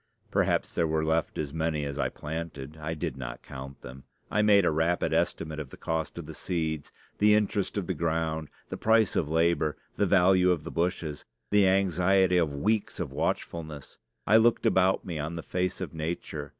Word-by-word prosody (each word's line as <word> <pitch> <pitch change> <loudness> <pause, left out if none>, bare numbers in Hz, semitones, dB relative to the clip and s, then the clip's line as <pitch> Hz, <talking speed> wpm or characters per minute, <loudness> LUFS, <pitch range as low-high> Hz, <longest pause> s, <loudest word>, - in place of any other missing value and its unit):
Perhaps - - +1
there 85 - +1
were 80 0 0
left 80 0 0
as 75 -2 -3
many 80 -2 -1
as 70 0 -5
I - - +1
planted; 75 -2 -6
I 80 +2 -3
did 70 -3 -4
not 65 -2 -7
count 70 +1 -9
them. 65 +2 -10 0.3
I 105 - +2
made 100 -3 +5
a - - +3
rapid 80 +3 +1
estimate 75 0 -1
of 75 -4 -6
the - - -12
cost 80 0 -3
of 85 - -6
the 80 - -8
seed, 80 -3 -3 0.3
the 105 0 +6
interest 105 -1 0
of 100 - -1
the 95 - -1
ground, 80 -1 -1 0.2
the - - -4
price 110 -2 +3
of 75 - 0
labor, 80 -1 +2 0.2
the 100 - +2
value 90 0 +5
of 85 -4 +1
the - - -6
bushes, 85 -3 -2 0.3
the 100 -2 +5
anxiety 95 0 +3
of 80 -4 +2
weeks 100 +9 -1
of - - -3
watchfulness. 80 -4 -4 0.3
I 110 - +6
looked 115 +1 +3
about 95 0 +3
me 85 -4 -4
on 80 +3 -3
the 85 - -5
face 90 0 -2
of - - -5
nature. 80 +2 -4
80 Hz, 195 wpm, -28 LUFS, 75-95 Hz, 0.3 s, the